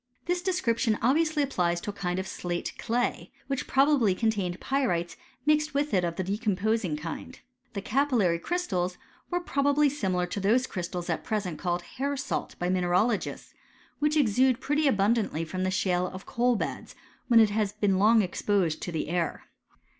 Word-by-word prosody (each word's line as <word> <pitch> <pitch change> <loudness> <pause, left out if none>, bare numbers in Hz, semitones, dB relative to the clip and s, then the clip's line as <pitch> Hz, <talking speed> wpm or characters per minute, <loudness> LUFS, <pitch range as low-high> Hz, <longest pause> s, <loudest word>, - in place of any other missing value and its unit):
This 355 +1 0
description 245 - +1
obviously 305 +4 +3
applies 175 -10 0
to 205 - -4
a - - -17
kind 180 -3 -2
of 190 0 -3
slate 175 -2 -4
clay, 240 +1 -1
which 275 -2 -3
probably 270 -8 +3
contained 200 -5 -1
pyrites 235 -12 -1 0.3
mixed 300 -1 +2
with 290 +1 0
it 185 -2 +3
of 170 -1 -1
the 190 - -2
decomposing 205 -3 0
kind. 165 +11 -7 0.3
The 200 -2 -4
capillary 235 -10 +2
cry»A 355 - -1
tals 180 - -2 0.3
were 355 - 0
probably 285 -2 +2
similar 190 -10 -1
to 180 +3 -4
those 225 +6 +3
crystals 175 -3 -5
at - - -2
present 195 -8 -2
called 175 -1 -1
hair 275 +8 -3
salt 270 0 -3
by 175 - -2
mineralogists, 185 +4 0 0.5
which 300 +1 +2
exude 255 -1 +3
pretM* 295 +2 +1
abundantly 205 - +1
from 185 +3 -3
the 185 - +1
shale 185 -1 +1
of 185 +1 -8
the - - -13
coal 245 +1 +2
beds, - - -4 0.3
when 235 -2 +6
it 220 -2 +5
has 210 -1 0
been 205 -3 +1
long 220 +2 +5
exposed 180 -2 0
to 175 - -4
the 160 - -2
air. 170 +1 -2
210 Hz, 175 wpm, -28 LUFS, 180-270 Hz, 0.5 s, when